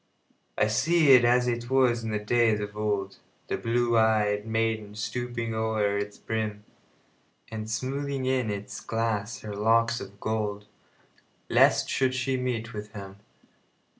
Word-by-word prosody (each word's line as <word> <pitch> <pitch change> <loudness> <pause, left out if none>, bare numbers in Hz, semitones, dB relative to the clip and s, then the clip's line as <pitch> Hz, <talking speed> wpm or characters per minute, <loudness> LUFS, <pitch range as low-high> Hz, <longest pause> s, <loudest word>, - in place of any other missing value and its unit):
I - - +4
see 140 +7 +3
it 125 -2 +8
as 125 +1 +3
it 120 0 -2
was 125 -3 +3
in 105 -2 -3
days 115 -1 +3
of 105 0 -5
old, 105 -2 -2 0.3
The - - 0
blue 120 0 +1
ey'd 105 -1 +2
maiden 110 -2 -1
stooping 115 +1 -3
o'er 110 -2 0
its 100 0 -3
brim, 110 -2 -3 0.9
And 110 -1 -5
smoothing 135 +3 -2
in 130 -3 +1
its 100 0 -5
glass 115 -2 -2
her 105 -1 -6
locks 115 +2 +2
of 100 +1 -10
gold, 105 -2 -2 0.8
Lest - - +4
she 130 -1 +1
should 130 0 -1
meet 125 -2 -3
with 105 -1 -7
him. 100 -1 -9
110 Hz, 140 wpm, -27 LUFS, 105-120 Hz, 0.9 s, it